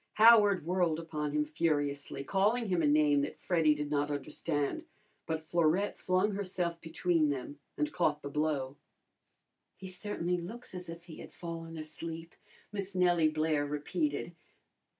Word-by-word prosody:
Howard 210 -6 +6
whirled 175 -2 +1
upon 155 -3 -3
him 150 0 +1
furiously, 145 -3 -1
calling 210 - +1
him 180 -2 +2
a 150 - +3
name 145 -1 +4
that 140 - -4
Freddy 160 -4 +3
did 150 0 -4
not 145 0 +1
understand, 145 - -2 0.4
but 160 -1 -2
Florette 170 +4 +1
flung 185 +3 +1
herself 180 -4 -2
between 165 -1 +1
them 145 +1 -4 0.2
and 300 0 -1
caught 150 -4 +1
the - - -4
blow. 145 -2 -1 1.0
"He 190 - -9
certainly 180 -2 -2
looks 215 +8 -8
as 180 -1 -7
if 165 0 -8
he 170 -3 -11
had - - -11
fallen 165 -1 -6
asleep," 165 +2 -7 0.4
Miss 200 -2 -5
Nellie 175 -3 +4
Blair 155 -1 +1
repeated. 150 +2 -2
165 Hz, 150 wpm, -32 LUFS, 150-180 Hz, 1.0 s, Howard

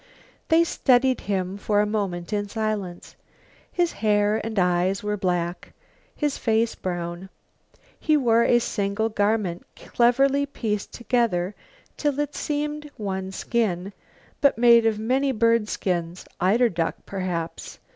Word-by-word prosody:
They 330 0 +5
studied 260 -5 +2
him 190 -1 -1
for 205 +1 +1
a 210 - +3
moment 200 -4 -3
in 205 -1 -1
silence. 210 -5 -4 0.6
His 350 -2 +1
hair 210 0 +1
and 220 0 -5
eyes 180 +2 +1
were 210 0 -1
black, 180 -3 -2 0.4
his 295 -2 -1
face 225 0 +1
brown. 175 0 -5 0.7
He 310 -1 +3
wore 235 -4 +3
a 240 - +4
single 210 -1 -1
garment, 205 -4 0
cleverly 275 +4 +2
pieced 210 -6 -3
together 230 -7 0 0.4
till 290 -2 -1
it 295 0 -1
seemed 295 0 -3
one 190 -2 -4
skin, 195 -3 -1 0.5
but 280 -4 +4
made 235 -1 +6
of 220 -1 +1
many 260 +5 +1
bird 230 -2 +2
skins, 175 -1 -2 0.2
eiderduck, 185 -3 +1
perhaps. 180 -4 -4
215 Hz, 125 wpm, -24 LUFS, 190-240 Hz, 0.7 s, made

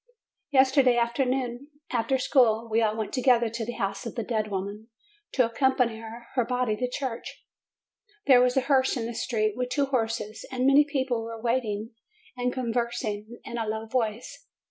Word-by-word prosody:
Yesterday 265 -2 +4
afternoon, 250 +2 0 0.2
after 250 +2 +1
school, 235 -4 +3
we 225 +1 +1
all 215 -1 +1
went 220 -2 -3
to 255 - 0
gether 240 -3 +4
to 230 0 -3
the 240 +2 -4
house 195 +2 -3
of 230 - -7
the 230 - -2
dead 215 -2 -1
woman, 200 +3 -5 0.4
to 255 - +3
accompany 240 -1 +1
her 235 +3 -4
body 250 -2 0
to 250 +3 -2
church. 250 -2 -5 0.8
There 255 -3 +7
was 250 +1 +2
a - - +5
hearse 265 -1 +2
in 230 - -2
the 235 - -4
street, 215 -3 -1
with 250 0 -2
two 280 +3 +1
horses, 225 -5 -2
and 255 0 -1
many 280 +2 +6
people 265 -5 -1
were 225 0 -6
waiting, 230 -2 -1 0.4
and 250 0 -1
conversing 235 -2 -3
in 235 - -5
a 225 - -2
low 220 +1 -3
voice. 225 -1 -3
240 Hz, 175 wpm, -27 LUFS, 225-255 Hz, 0.8 s, There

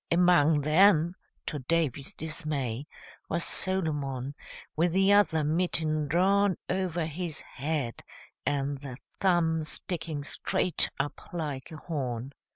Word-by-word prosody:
Among 170 -4 +5
them, 165 +2 +5 0.3
to 150 - -3
Davy's 140 -1 -1
dismay, 150 -5 -3 0.4
was 170 - 0
Solomon, 145 -8 -1 0.4
with 165 +2 +2
the 195 +2 +5
other 180 -6 +4
mitten 155 -1 0
drawn 190 +4 +3
over 180 -3 -1
his 165 0 -5
head 140 -4 -3 0.4
and 140 -1 -1
the 135 -3 -8 0.2
thumb 170 -4 +3
sticking 155 -1 -5
straight 170 +3 +1
up 145 +1 -4
like 150 -6 -4
a 160 - -7
horn. 130 -6 -4
155 Hz, 115 wpm, -29 LUFS, 145-175 Hz, 0.4 s, Among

